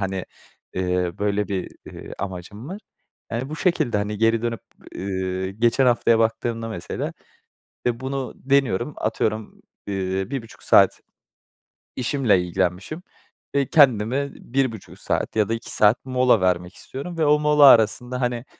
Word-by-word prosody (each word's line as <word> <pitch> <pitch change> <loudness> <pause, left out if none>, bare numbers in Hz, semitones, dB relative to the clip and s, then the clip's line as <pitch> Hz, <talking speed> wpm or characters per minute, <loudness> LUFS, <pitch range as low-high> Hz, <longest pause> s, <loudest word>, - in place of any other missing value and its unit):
hani, 95 -1 -2 0.5
ııı, 90 -1 -1
böyle 105 0 0
bir, 95 -2 -3 0.2
ııı, - - -10
amacım 100 - -6
var. 200 +3 -7 0.5
Yani, 120 +4 -2
bu 155 - -4
şekilde 170 - +1
hani 105 0 -3
geri 115 0 +2
dönüp, 115 -1 -2 0.4
ııı, 95 0 -3
geçen 120 +6 +2
haftaya 115 -1 +3
baktığımda 115 0 -1
mesela, 105 -6 -4 0.8
e, 120 0 -1
bunu 135 0 -4
deniyorum. 135 -1 +1
Atıyorum, 110 0 -2 0.3
ııı, 95 +1 -2
1.30 120 -5 -6
saat - - +5 1.0
işimle 125 -7 +2
ilgilenmişim, 90 - -2 0.5
e, 140 -2 +1
kendime 135 -1 +4
1.30 125 -5 -3
saat - - -2
ya 105 0 +2
da - - +1
2 115 - -5
saat 105 +5 +3
mola 125 -5 +3
vermek 90 0 0
istiyorum 165 +6 -7
ve 160 - +2
o 150 0 +4
mola 150 -1 +5
arasında, 125 +1 +5
hani, 120 0 -1
115 Hz, 140 wpm, -23 LUFS, 100-130 Hz, 1.0 s, saat